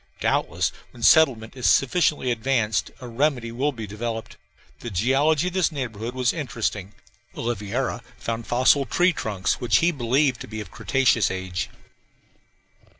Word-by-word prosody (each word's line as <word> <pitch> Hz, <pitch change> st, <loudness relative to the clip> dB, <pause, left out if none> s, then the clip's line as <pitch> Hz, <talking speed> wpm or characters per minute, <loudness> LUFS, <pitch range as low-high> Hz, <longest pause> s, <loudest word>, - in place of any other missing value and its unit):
Doubtless -, -, 0 dB, 0.2 s
when 120 Hz, -, -12 dB
settlement 130 Hz, -8 st, +4 dB
is 125 Hz, -, +1 dB
sufficiently 140 Hz, -2 st, +2 dB
advanced 115 Hz, -2 st, 0 dB
a 125 Hz, -, -7 dB
remedy 125 Hz, -1 st, 0 dB
will 135 Hz, +5 st, 0 dB
be 115 Hz, -5 st, -7 dB
developed. 115 Hz, +2 st, -5 dB, 0.4 s
The 120 Hz, -, -6 dB
geology 135 Hz, -, +2 dB
of -, -, -13 dB
this 185 Hz, -3 st, +2 dB
neighborhood 120 Hz, -4 st, -5 dB
was 125 Hz, -2 st, +1 dB
interesting 110 Hz, -, -3 dB, 0.4 s
Oliveira 115 Hz, +2 st, -2 dB, 0.2 s
found 115 Hz, 0 st, -4 dB
fossil 130 Hz, +3 st, +3 dB
tree 180 Hz, +1 st, +3 dB
trunks 100 Hz, -, -2 dB
which 115 Hz, -4 st, +3 dB
he 170 Hz, +6 st, +3 dB
believed 130 Hz, -1 st, +1 dB
to -, -, -7 dB
be 110 Hz, 0 st, -6 dB
of 105 Hz, -4 st, -8 dB
cretaceous 115 Hz, +1 st, +2 dB
age. 95 Hz, -2 st, -4 dB
120 Hz, 145 wpm, -24 LUFS, 110-135 Hz, 0.4 s, settlement